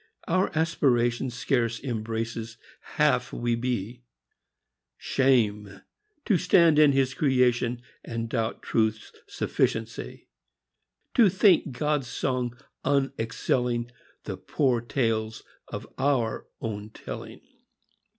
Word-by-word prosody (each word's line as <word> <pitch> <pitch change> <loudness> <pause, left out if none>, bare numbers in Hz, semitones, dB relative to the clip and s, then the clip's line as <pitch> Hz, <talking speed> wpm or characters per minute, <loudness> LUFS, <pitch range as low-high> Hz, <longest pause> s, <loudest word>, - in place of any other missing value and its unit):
Our 185 +3 +2
aspiration 130 -6 +2
Scarce 120 -2 0
embraces 115 -1 -4 0.4
half - - +2
we 120 0 -1
be. 120 -1 -2 1.0
Shame! 105 -7 +1 0.4
to 205 - +3
stand 170 -4 +5
in 150 -2 +7
His 135 -1 +1
creation 125 -3 +1 0.2
And 115 -1 -4
doubt 115 -1 -2
Truth's 110 -1 0 0.2
sufficiency! 110 - -2 0.9
To 225 -5 +6
think 185 -6 +4
God's 150 -4 0
song 125 -1 -2 0.3
unexcelling 125 -3 0 0.3
The - - -5
poor 130 -5 0
tales 115 -3 -1 0.2
of - - -6
our 130 -5 0
own 105 -2 -5
telling. - - -8
120 Hz, 95 wpm, -27 LUFS, 115-135 Hz, 1.0 s, in